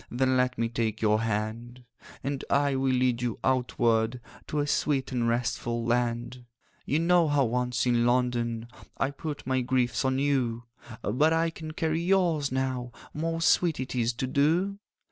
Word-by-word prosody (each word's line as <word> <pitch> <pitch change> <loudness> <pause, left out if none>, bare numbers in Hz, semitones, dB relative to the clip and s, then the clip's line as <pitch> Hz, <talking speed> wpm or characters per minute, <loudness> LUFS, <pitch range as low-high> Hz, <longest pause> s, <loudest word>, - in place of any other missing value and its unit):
Then 130 +1 +1
let 125 0 +1
me 115 - +1
take 115 -2 -2
your 110 0 +2
hand; 115 +3 -3 0.4
And 140 0 -3
I 140 0 +2
will 135 0 +1
lead 125 -2 +1
you 120 -2 -2
outward 120 -2 +1 0.3
To 150 - -3
a 145 - +1
sweet 140 -2 0
and 120 -2 0
restful 120 0 -1
land. 120 +1 -1 0.4
'You 145 - +2
know 170 0 +4
how 145 -2 +3
once 125 +1 0
in 120 -1 +3
London 120 -2 0 0.3
I 135 - 0
put 145 +1 -6
my 130 0 +1
griefs 125 0 0
on 130 0 +1
you; 130 -4 0 0.4
But 145 +10 +2
I 165 0 +1
can 155 -1 -8
carry 160 0 -1
yours 170 -6 +2
now— 130 -2 -2 0.2
Most 165 +1 0
sweet 170 -4 +2
it 130 - -4
is 120 -2 +1
to 130 +3 -3
do! 165 +9 +1
130 Hz, 165 wpm, -28 LUFS, 120-145 Hz, 0.4 s, know